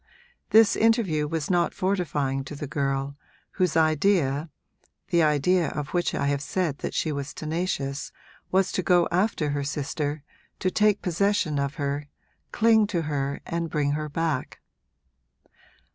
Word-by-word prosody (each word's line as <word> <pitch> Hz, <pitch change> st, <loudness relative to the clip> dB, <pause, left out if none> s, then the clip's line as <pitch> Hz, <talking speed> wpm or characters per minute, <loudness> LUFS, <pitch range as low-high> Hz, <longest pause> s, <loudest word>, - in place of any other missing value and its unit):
This 225 Hz, 0 st, +6 dB
interview 210 Hz, -10 st, +2 dB
was 160 Hz, +2 st, -2 dB
not 175 Hz, -1 st, +1 dB
fortifying 150 Hz, -8 st, -1 dB
to 150 Hz, -, -7 dB
the 145 Hz, -, -5 dB
girl, 135 Hz, 0 st, -2 dB, 0.3 s
whose 180 Hz, -4 st, 0 dB
idea 155 Hz, -2 st, +2 dB, 0.6 s
the 170 Hz, -, +3 dB
idea 155 Hz, +3 st, +3 dB
of 145 Hz, -2 st, -4 dB
which 175 Hz, -1 st, 0 dB
I -, -, -1 dB
have 140 Hz, 0 st, 0 dB
said 150 Hz, 0 st, -2 dB
that -, -, -4 dB
she 155 Hz, -, 0 dB
was 140 Hz, -1 st, -5 dB
tenacious 155 Hz, -4 st, -3 dB, 0.4 s
was 190 Hz, 0 st, +2 dB
to -, -, 0 dB
go 175 Hz, 0 st, +3 dB
after 180 Hz, -5 st, +1 dB
her 145 Hz, 0 st, -1 dB
sister, 145 Hz, +1 st, -3 dB, 0.3 s
to 185 Hz, -, -1 dB
take 210 Hz, +1 st, +2 dB
possession 180 Hz, -4 st, +1 dB
of 140 Hz, +1 st, -2 dB
her, 145 Hz, 0 st, -3 dB, 0.4 s
cling 220 Hz, -1 st, +4 dB
to 175 Hz, -6 st, -1 dB
her 140 Hz, -2 st, -2 dB
and 170 Hz, 0 st, -3 dB
bring 145 Hz, -2 st, 0 dB
her 150 Hz, +1 st, -2 dB
back. 155 Hz, -3 st, -2 dB
155 Hz, 145 wpm, -26 LUFS, 145-180 Hz, 0.6 s, This